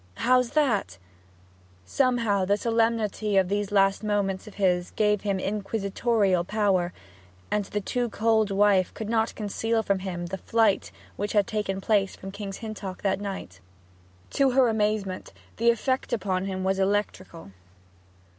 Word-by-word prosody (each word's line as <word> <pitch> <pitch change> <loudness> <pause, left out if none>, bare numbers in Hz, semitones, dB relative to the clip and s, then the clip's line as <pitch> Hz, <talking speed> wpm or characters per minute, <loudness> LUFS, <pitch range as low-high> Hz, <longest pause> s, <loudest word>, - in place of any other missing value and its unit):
'How's 250 - +3
that?' 235 - +1 0.9
Somehow 230 - +1
the 200 +2 +2
solemnity 225 -2 0
of 190 -2 +3
these 205 0 -1
last 195 0 +3
moments 205 -2 -1
of 210 - -11
his 180 -3 +1
gave 210 -1 +1
him 200 -2 -1
inquisitorial 200 -1 0
power, 190 -3 +1 0.6
and 210 -1 0
the 205 +1 -3
too 245 +4 -1
cold 220 -1 +2
wife 195 -2 +3
could 220 -1 -5
not 225 -1 0
conceal 225 +2 -1
from 200 -2 0
him 180 -2 -4
the 190 +2 -5
flight 225 -1 +1 0.3
which 205 +1 -3
had 205 -2 +3
taken 210 -2 -2
place 195 -1 +1
from 195 - -8
King's 200 -1 -6
Hintock 200 -4 -7
that 195 0 0
night. 190 - -6 0.7
To 275 -1 +3
her 255 -1 +4
amazement, 210 -3 -1 0.2
the 235 +1 +3
effect 260 +4 0
upon 190 -4 -1
him 190 -1 -3
was 190 0 0
electrical. 190 - -2
205 Hz, 145 wpm, -26 LUFS, 195-220 Hz, 0.9 s, her